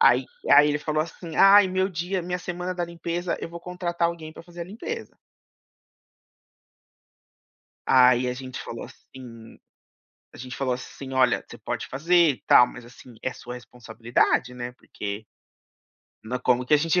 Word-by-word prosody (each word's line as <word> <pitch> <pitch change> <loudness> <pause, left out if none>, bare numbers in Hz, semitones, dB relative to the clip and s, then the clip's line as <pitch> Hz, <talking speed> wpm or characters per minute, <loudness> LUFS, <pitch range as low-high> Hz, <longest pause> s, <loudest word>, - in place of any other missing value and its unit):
Aí 460 - +5 0.3
aí 145 +1 +8
ele 150 0 0
falou 155 0 0
assim: 165 0 -9
"Ai, 195 0 +8
meu 185 +1 +1
dia 180 +1 -3
minha 180 +1 -3
semana 180 +1 -4
da 175 -1 -1
limpeza, 170 +1 -3
eu - - -5
vou 170 0 -9
contratar 175 -1 -1
alguém 160 -2 -7
para 160 - -12
fazer 175 0 -12
a - - -3
limpeza". 235 - -7 2.7
Aí 125 -1 +5
a - - -1
gente 130 0 -7
falou - - -7
assim 115 -3 -13 0.8
a - - -13
gente 125 -1 -7
falou 130 -2 -1
assim: 130 +1 -8
"Olha, 130 -1 +3
você - - -11
pode - - -4
fazer 155 +7 -2 0.2
e 125 - -11
tal, 125 - +7
mas 120 - -11
assim, 120 0 -15
é 130 - -2
sua 125 0 -8
responsabilidade, 120 +1 -1
né, 120 0 -6
porque 105 -3 -7 1.0
nã" 125 +3 -3
Como 125 0 +2
que - - -2
a - - +8
gente 165 +3 +2
150 Hz, 165 wpm, -25 LUFS, 125-175 Hz, 2.7 s, aí